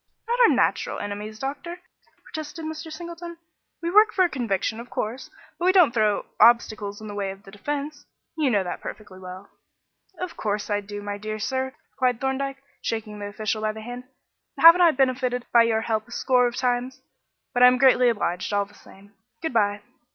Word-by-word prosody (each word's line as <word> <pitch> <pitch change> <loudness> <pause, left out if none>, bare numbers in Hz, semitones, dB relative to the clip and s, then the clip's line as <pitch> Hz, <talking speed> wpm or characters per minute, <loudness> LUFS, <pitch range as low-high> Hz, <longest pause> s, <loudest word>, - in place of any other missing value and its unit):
"Not 480 +1 0
our 480 - +8
natural - - +1
enemies, 205 +1 -6
doctor," 285 +8 -5 0.4
protested 315 +1 -7
Mr. 315 +1 -6
Singleton. 340 +1 -8 0.5
"We 340 - -1
work 425 +3 +6
for 375 - +3
a - - 0
conviction, 225 - -2
of 240 +1 -9
course, 235 +3 -4 0.3
but 350 - -1
we 370 - +6
don't 355 -10 +5
throw 215 -3 +1
obstacles 215 -3 +3
in 215 - -8
the 205 - -6
way 200 -1 -2
of 195 +1 -9
the 195 - -13
defence. 290 +8 -5 0.3
You 305 -4 +1
know 205 -5 +2
that 175 - -5
perfectly 195 -3 -9
well." 185 +1 -10 0.7
"Of 365 0 -5
course 210 0 -2
I 205 0 +1
do, 205 0 -8
my 205 0 -4
dear 215 +1 -4
sir," 260 +4 -2 0.2
replied 250 -3 0
Thorndyke, 275 +1 -2 0.2
shaking 215 -2 -4
the 205 - -5
official 215 +1 -3
by 215 0 -1
the 220 - -9
hand. 245 +2 -8 0.5
"Haven't 335 +2 +9
I 345 - +7
benefited 255 -3 0
by 235 - +8
your 225 -1 +2
help 220 -1 -2
a - - -17
score 250 0 +2
of 240 - -4
times? 250 +1 -1 0.5
But 245 - +1
I 250 - +10
am 250 0 +4
greatly 250 -1 +5
obliged 190 -5 -2
all 200 0 +2
the 205 - -21
same. 200 +1 -18 0.3
Good 320 - -2
bye." 205 -2 +1
240 Hz, 195 wpm, -24 LUFS, 210-275 Hz, 0.7 s, I